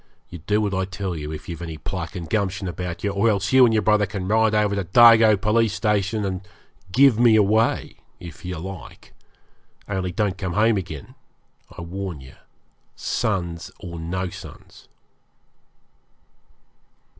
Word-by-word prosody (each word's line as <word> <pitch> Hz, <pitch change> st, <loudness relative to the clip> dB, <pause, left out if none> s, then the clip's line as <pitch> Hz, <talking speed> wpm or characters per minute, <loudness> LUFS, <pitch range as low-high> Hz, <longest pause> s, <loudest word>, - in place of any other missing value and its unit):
'You 90 Hz, -, -8 dB
do 105 Hz, +7 st, 0 dB
what 100 Hz, -2 st, -1 dB
I 95 Hz, 0 st, 0 dB
tell 95 Hz, -2 st, -5 dB
you 75 Hz, -1 st, -6 dB
if 75 Hz, -, -8 dB
you've 85 Hz, -1 st, -7 dB
any 80 Hz, -2 st, -6 dB
pluck 90 Hz, -1 st, -6 dB
and 85 Hz, -3 st, -6 dB
gumption 100 Hz, -1 st, -1 dB
about 90 Hz, 0 st, -5 dB
you; 100 Hz, -, 0 dB
or 100 Hz, +3 st, +2 dB
else 100 Hz, +2 st, -1 dB
you 130 Hz, -1 st, +8 dB
and 115 Hz, -, +3 dB
your 110 Hz, -1 st, +1 dB
brother 105 Hz, -1 st, +3 dB
can 100 Hz, -2 st, -5 dB
ride 110 Hz, +1 st, +2 dB
over 105 Hz, -1 st, +2 dB
to 100 Hz, -1 st, -1 dB
Dargo 110 Hz, +1 st, +6 dB
Police 110 Hz, +1 st, +1 dB
Station 105 Hz, 0 st, 0 dB
and 95 Hz, -1 st, -3 dB, 0.5 s
"give 130 Hz, 0 st, +5 dB
me 120 Hz, -2 st, +6 dB
away" 110 Hz, +2 st, +1 dB, 0.2 s
if 85 Hz, -4 st, -11 dB
you 90 Hz, -1 st, -5 dB
like; 95 Hz, +1 st, -10 dB, 0.7 s
only 95 Hz, -2 st, -2 dB
don't 95 Hz, +1 st, -1 dB
come 95 Hz, -3 st, -3 dB
home 110 Hz, +2 st, +3 dB
again, 80 Hz, -7 st, -7 dB, 0.6 s
I -, -, -6 dB
warn 90 Hz, -2 st, -6 dB
you, 65 Hz, 0 st, -13 dB, 0.6 s
sons 85 Hz, -8 st, -2 dB
or 85 Hz, -2 st, -8 dB
no 90 Hz, +3 st, -3 dB
sons.' -, -, -13 dB
95 Hz, 160 wpm, -23 LUFS, 90-105 Hz, 0.7 s, you